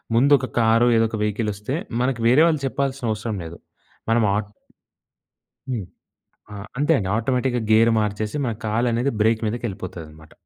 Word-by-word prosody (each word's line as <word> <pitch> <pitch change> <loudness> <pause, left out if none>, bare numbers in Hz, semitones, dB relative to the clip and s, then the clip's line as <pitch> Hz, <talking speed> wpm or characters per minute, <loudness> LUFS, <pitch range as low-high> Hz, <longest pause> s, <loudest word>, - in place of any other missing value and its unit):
ముందొక 135 +1 +4
కారో, 115 +1 +4
ఏదొక 115 0 +1
వెహికలొస్తే, 105 +3 -2 0.3
మనకి 125 -2 -1
వేరే 130 +6 +5
వాళ్ళు 155 -4 0
చెప్పాల్సిన 135 -1 -2
అవసరం 110 0 -3
లేదు. 85 +1 -9 0.5
మనం 115 -1 +3
ఆట్ 105 -1 -2 1.2
హ్మ్. 110 -7 -3 0.7
ఆ! - - -7 0.2
అంతే 150 +3 +3
అండి. 95 -2 -2
ఆటోమేటిక్‌గా 125 0 0
గేర్ 115 +1 +5
మార్చేసి, 105 +3 -2
మన 115 - -1
కాలనేది 120 +4 0
బ్రేక్ 110 +1 +2
మీదకెళ్ళిపోతాదనమాట. 90 -9 -6
115 Hz, 130 wpm, -22 LUFS, 105-125 Hz, 1.2 s, వేరే